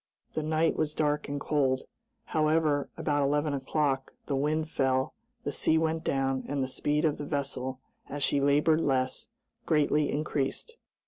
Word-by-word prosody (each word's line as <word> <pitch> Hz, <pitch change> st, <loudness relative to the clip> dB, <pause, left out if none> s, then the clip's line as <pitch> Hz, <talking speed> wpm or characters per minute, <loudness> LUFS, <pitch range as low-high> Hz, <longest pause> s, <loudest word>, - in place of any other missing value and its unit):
The 155 Hz, -, -1 dB
night 160 Hz, +1 st, +1 dB
was 150 Hz, -1 st, -1 dB
dark 150 Hz, -1 st, 0 dB
and 145 Hz, 0 st, -2 dB
cold. 135 Hz, -3 st, +1 dB, 0.4 s
However, 155 Hz, -2 st, +2 dB
about 150 Hz, -3 st, +1 dB
eleven 145 Hz, +1 st, +1 dB
o'clock, 135 Hz, 0 st, -1 dB
the 140 Hz, -, -1 dB
wind 155 Hz, +3 st, 0 dB
fell, 130 Hz, -3 st, +1 dB, 0.3 s
the -, -, -2 dB
sea 160 Hz, -, +2 dB
went 160 Hz, 0 st, 0 dB
down, 135 Hz, -2 st, 0 dB
and 140 Hz, -1 st, -1 dB
the -, -, -1 dB
speed 150 Hz, +4 st, 0 dB
of 150 Hz, -2 st, +1 dB
the -, -, -3 dB
vessel, 135 Hz, -3 st, -3 dB, 0.3 s
as 145 Hz, 0 st, -3 dB
she 140 Hz, -, +2 dB
labored 150 Hz, +3 st, +4 dB
less, 130 Hz, -3 st, 0 dB, 0.4 s
greatly 150 Hz, -1 st, +3 dB
increased. 150 Hz, -, -2 dB
145 Hz, 155 wpm, -29 LUFS, 135-155 Hz, 0.4 s, labored